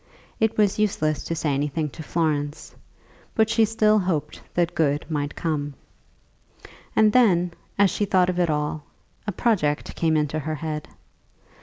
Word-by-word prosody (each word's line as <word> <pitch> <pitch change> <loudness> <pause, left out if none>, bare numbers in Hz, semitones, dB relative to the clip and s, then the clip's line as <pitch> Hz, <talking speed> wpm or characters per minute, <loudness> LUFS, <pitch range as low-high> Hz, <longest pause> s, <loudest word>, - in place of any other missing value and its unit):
It 220 0 +1
was 210 -1 +2
useless 155 -8 0
to 165 - -2
say 155 -2 0
anything 150 +3 -1
to 160 - -9
Florence, 150 -2 -2 0.6
but 220 0 +3
she 225 -1 +4
still 215 -1 +3
hoped 160 -6 -2
that 175 -1 +1
good 145 -2 +1
might 145 -1 -2
come. 145 -3 -2 1.2
And 215 -1 +5
then, 180 -8 +4 0.2
as 200 -2 +4
she 205 - 0
thought 185 -3 +3
of 180 -1 -1
it 175 -2 +2
all, 150 0 -1 0.5
a - - +1
project 175 -8 0
came 160 -2 +2
into 150 0 0
her 155 +1 -3
head. 155 -1 -4
165 Hz, 155 wpm, -24 LUFS, 150-205 Hz, 1.2 s, And